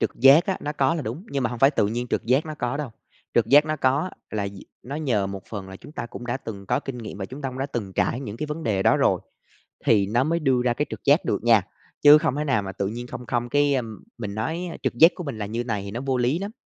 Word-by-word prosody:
trực - - +1
giác 135 +5 +7
á, 190 - 0
nó 150 - -3
có 140 +1 +2
là 155 - -2
đúng, 130 - -5
nhưng 140 -1 -1
mà 120 - 0
hông 120 - -5
phải 135 +4 +6
tự 110 -8 +1
nhiên 120 +3 -2
trực - - -1
giác 130 +7 +2
nó 155 - -5
có 120 +3 -1
đâu. 145 -5 -4 0.4
Trực 115 -2 +3
giác 145 +5 +6
nó 155 0 -1
có 140 +7 +1 0.2
là 100 -2 -2
d 100 - -11 0.3
nó 140 +5 -6
nhờ 120 -10 0
một 95 -1 -6
phần 100 -3 -6
là 95 - -9
chúng 145 - -14
ta 120 - -5
cũng 120 +1 -9
đã 120 +1 -1
từng 100 -7 -8
có 125 +4 +1
kinh 135 -4 -6
nghiệm 110 -3 -7
và 95 - -3
chúng 135 +7 -9
ta 135 - -1
cũng 130 - -8
đã 135 - -1
từng 110 -8 -5
trải 120 +6 0
những 110 -5 -6
cái 150 - -3
vấn 150 +2 -5
đề 100 -6 0
đó - - +4
rồi, - - +2 0.7
thì 100 -3 +4
nó 120 +5 +2
mới 165 +3 0
đưa 130 -5 +2
ra 120 -1 +2
cái 145 +4 -1
trực - - -7
giác 145 +5 +4
được - - -1
nha. 115 -4 +5 0.4
Chứ 145 +1 +9
không 155 -3 0
thể 150 - -1
nào 135 -8 +1
mà 95 - -5
tự 95 +1 -2
nhiên 120 +4 -5
không 125 - -8
không 120 0 -1
cái, 145 +1 +3
a, 130 - +1 0.4
mình 105 -4 -5
nói, 160 +11 -2
a, - - -8
trực - - 0
giác 165 +3 +8
của 180 - -6
mình 140 -7 -5
là 105 - -3
như 115 +4 -3
này 115 -4 -2
thì 100 - -7
nó 120 - -4
vô 135 -1 0
lý 125 +6 +1
lắm. 200 +2 -4
125 Hz, 310 wpm, -24 LUFS, 110-145 Hz, 0.7 s, Chứ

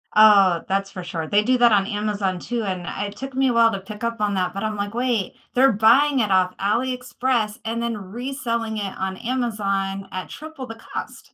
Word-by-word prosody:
Oh, 200 -5 +6
that's 195 0 0
for 185 - -7
sure. 165 -2 -4
They 210 +1 +3
do 255 +2 +3
that 240 -1 +5
on 200 -2 +4
Amazon 205 -3 -2
too, 235 +2 -3
and 185 -3 -3
I 205 - -3
it 200 - -10
took 270 0 -6
me 265 0 +3
a 245 - +1
while 230 -1 +5
to 195 - -3
pick 210 +3 -10
up 230 -1 -2
on 205 -1 +1
that, 185 -1 -1
but 195 +2 -4
I'm 215 0 -2
like, 205 +1 -3
"Wait, 240 -5 0 0.2
they're 265 +1 +5
buying 255 +7 +4
it 210 - 0
off 185 -1 +3
Ali 235 +6 +1
Express, 250 -3 -1
and 230 +1 -2
then 235 -2 -2
reselling 230 +1 -4
it 200 -2 -4
on 190 0 -3
Amazon 200 -5 -2
at 185 0 -5
triple 310 -3 -8
the 225 -2 -8
cost." - - -8
215 Hz, 220 wpm, -22 LUFS, 195-240 Hz, 0.2 s, Oh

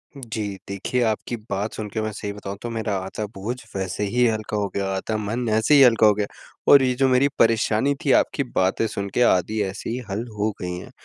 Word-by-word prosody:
जी 115 -5 -5 0.3
देखिए, 100 +6 -2
आपकी 110 +1 -1
बात 100 +2 -2
सुन 110 -1 -5
के 110 - -1
मैं 110 0 -2
सही 105 0 -5
बताऊँ 100 -1 -7
तो 120 - -4
मेरा 110 -3 -2
आधा 105 +3 -4
बोझ 105 +6 -3 0.2
वैसे 95 +1 -2
ही 120 +5 +2
हल्का 110 -1 -2
हो 100 -1 0
गया, 100 -1 0
आधा 110 +3 -2
मन 115 +3 -2
ऐसे 110 +7 +3
ही 140 - +7
हल्का 115 -4 +6
हो 105 - +6
गया। 105 0 -2 0.4
और 140 - +9
ये 125 - +2
जो 135 +1 +3
मेरी 130 +2 +4
परेशानी 115 +3 +3
थी 140 - +2
आपकी 140 - -1
बातें 105 -3 0
सुन 100 -1 -4
के 125 - +1
आधी 110 +1 +2
ऐसी 95 +1 -5
ही 120 - -2
हल 105 +5 -3
हो 105 +1 +1
गई 90 0 -3
हैं। 90 - -10
110 Hz, 230 wpm, -23 LUFS, 100-120 Hz, 0.4 s, और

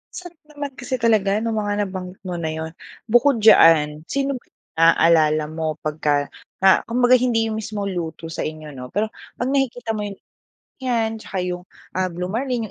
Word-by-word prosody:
Sarap 350 -3 -9
naman 290 -2 -6
kasi 255 +1 -2
talaga 215 -3 +2
nung 225 -2 -1
mga 205 0 0
nabanggit 185 -1 -7
mo 180 -2 -4
na 160 - -2
yun. 160 0 -4 0.3
Bukod 240 0 +3
diyan, 155 -6 +6
sino 275 -2 -1
ba - - -31
yung - - -42 0.2
na-aalala 160 -2 +4
mo 160 -1 -2
pagka 150 -2 0 0.3
na 190 - +7
kumbaga 245 +1 +4
hindi 225 -3 +1
yung 220 - -2
mismo 205 -1 -4
luto 165 -3 -4
sa - - -7
inyo 155 -1 -6
'no 125 0 -7
pero 215 +1 +1 0.3
pag 245 - 0
nakikita 245 -4 0
mo 210 - -3
yung, 200 - -7 0.7
yan 225 -3 0
tsaka 190 - -5
yung 180 0 -4 0.3
ah, 185 0 +1
Blue 180 +1 -4
Marlin 245 -1 -2
205 Hz, 180 wpm, -22 LUFS, 165-235 Hz, 0.7 s, na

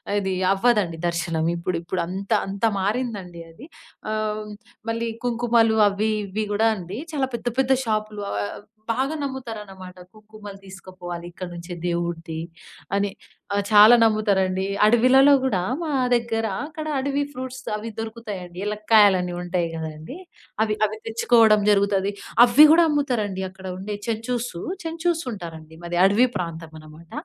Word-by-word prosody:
అది 190 -2 0 0.2
అవ్వదండి 195 -6 +1
దర్శనం 170 -1 -1
ఇప్పుడు 170 0 -2
ఇప్పుడంత 185 +3 -4
అంత 195 +3 -2
మారిందండి 200 -4 -3
అది 235 - -13 0.4
ఆహ్, 215 0 -2 0.4
మళ్ళీ 230 0 -2 0.2
కుంకుమలు 230 -2 +2
అవ్వి 210 +2 -1
ఇవ్వి 210 +2 -3
గూడా 220 +2 +3
అండి. 185 +6 -7
చాలా 270 -3 0
పెద్ద 235 - -6
పెద్ద 265 0 +2
షాపులు 215 -2 -2
ఆహ్, 100 0 -3 0.3
బాగా 265 +6 -1
నమ్ముతారనమాట. 210 -9 -7 0.2
కుంకుమలు 215 -2 -12
తీసుకుపోవాలి 185 -2 -8
ఇక్కడి 180 +1 -8
నుంచే 175 +1 -8
దేవుడిది 170 -2 -3 0.6
అని. 200 0 +1 0.4
ఆహ్, 200 0 +1
చాలా 215 +2 +8
నమ్ముతారండి 195 -4 +1 0.2
అడవిలలో 255 +5 +6
గూడా 205 -9 +1 0.2
మా 330 - -3 0.3
దగ్గర 230 -1 -1 0.2
అక్కడ 310 0 -7
అడవి 280 +1 0
ఫ్రూట్స్ 260 0 -6 0.2
అవి 215 +2 -5
దొరుకుతాయండి 210 -6 -7
ఎలక్కాయలని 210 -4 +3
ఉంటాయి 175 -1 -1
గదండీ! 160 - -7 0.5
అవి, 215 -1 -1
అవి 215 - -7
తెచ్చుకోవడం 225 -2 +4
జరుగుతది. 200 -1 +2 0.3
అవి 250 +5 +8
గూడా 335 +1 +6
అమ్ముతరండి 240 -10 -1
అక్కడ 190 0 -11
ఉండే 205 +2 -5
చెంచూసు. 230 -3 -3 0.2
చెంచూస్ 330 +1 -1
ఉంటారండి. 160 -4 -9
మాది 175 0 -2
అడవి 210 +6 +4
ప్రాంతం 165 -2 -6
అనమాట. 155 +2 -15
210 Hz, 130 wpm, -23 LUFS, 180-230 Hz, 0.6 s, చాలా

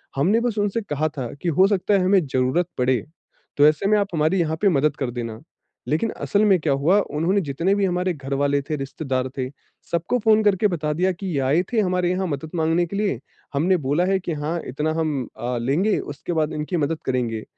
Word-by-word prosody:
हमने 185 +12 +3
बस 235 -3 -1
उनसे 205 +2 0
कहा 155 -5 -1
था 125 -3 -4
कि 175 - 0
हो 185 +5 +4
सकता 205 0 +1
है 190 - +2
हमें 190 -3 +4
जरुरत 130 +6 +1
पड़े, 125 -2 +1 0.5
तो 145 +1 +7
ऐसे 155 +5 +1
में 215 - +4
आप 200 - 0
हमारी 160 +4 +2
यहाँ 160 -2 0
पे 205 - +5
मदद 150 -3 +2
कर 130 -3 -2
देना। 115 -2 -5 0.5
लेकिन 160 +10 +1
असल 205 +1 +2
में 195 -3 +4
क्या 145 -2 +1
हुआ 160 +9 +3 0.2
उन्होंने 185 +6 +2
जितने 165 +5 0
भी 200 -1 +1
हमारे 180 0 0
घर 140 -3 -6
वाले 140 0 +1
थे, 155 - -3
रिश्तेदार 135 -2 -3
थे, 130 -1 -2 0.4
सबको 170 +9 0
फ़ोन 220 -1 +4
करके 205 0 +3
बता 155 -5 -2
दिया 185 +4 +1
कि 190 +2 -6
ये - - +1
आए 155 +7 +3
थे 230 - +3
हमारे 180 -2 +1
यहाँ 185 +1 -1
मदद 155 0 -4
माँगने 165 +1 +2
के 200 - -6
लिए 200 - 0 0.4
हमने 180 +6 +3
बोला 150 +3 0
है 190 0 +1
कि 175 -2 -4
हाँ, 155 +3 -2
इतना 150 +4 -1
हम 145 -6 -1
अ, 120 +2 -2
लेंगे 160 - +1
उसके 145 +4 -5
बाद 155 -1 0
इनकी 150 +4 -2
मदद 155 +1 -1
करेंगे। 120 -4 -1
160 Hz, 220 wpm, -23 LUFS, 140-190 Hz, 0.5 s, तो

